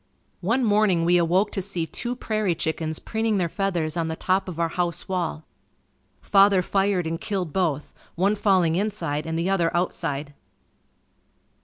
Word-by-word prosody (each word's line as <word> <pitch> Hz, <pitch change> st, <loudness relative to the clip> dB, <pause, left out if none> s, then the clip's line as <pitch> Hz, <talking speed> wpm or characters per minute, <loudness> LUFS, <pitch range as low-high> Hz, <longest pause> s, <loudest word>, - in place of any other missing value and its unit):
One 230 Hz, +8 st, +1 dB
morning 205 Hz, -5 st, +3 dB
we 175 Hz, +1 st, +4 dB
awoke 180 Hz, +5 st, +2 dB
to 195 Hz, -, -2 dB
see 180 Hz, -3 st, -2 dB
two 240 Hz, +8 st, -4 dB
prairie 215 Hz, -7 st, -1 dB
chickens 160 Hz, -1 st, -2 dB
preening 220 Hz, -1 st, -1 dB
their 180 Hz, -3 st, +1 dB
feathers 175 Hz, -4 st, -1 dB
on 165 Hz, -2 st, -1 dB
the 160 Hz, -, -3 dB
top 190 Hz, +3 st, 0 dB
of 170 Hz, -2 st, -7 dB
our 165 Hz, -1 st, +1 dB
house 175 Hz, -1 st, -2 dB
wall. 170 Hz, -4 st, -2 dB, 0.8 s
Father 195 Hz, -2 st, +4 dB
fired 195 Hz, -2 st, +1 dB
and 165 Hz, 0 st, -3 dB
killed 185 Hz, -6 st, -3 dB
both, 160 Hz, -6 st, -1 dB, 0.2 s
one 195 Hz, +4 st, +2 dB
falling 185 Hz, -6 st, +2 dB
inside 170 Hz, -7 st, -2 dB
and 160 Hz, 0 st, -2 dB
the 175 Hz, +3 st, 0 dB
other 175 Hz, -4 st, +2 dB
outside. 145 Hz, -5 st, -2 dB
180 Hz, 160 wpm, -24 LUFS, 165-200 Hz, 0.8 s, we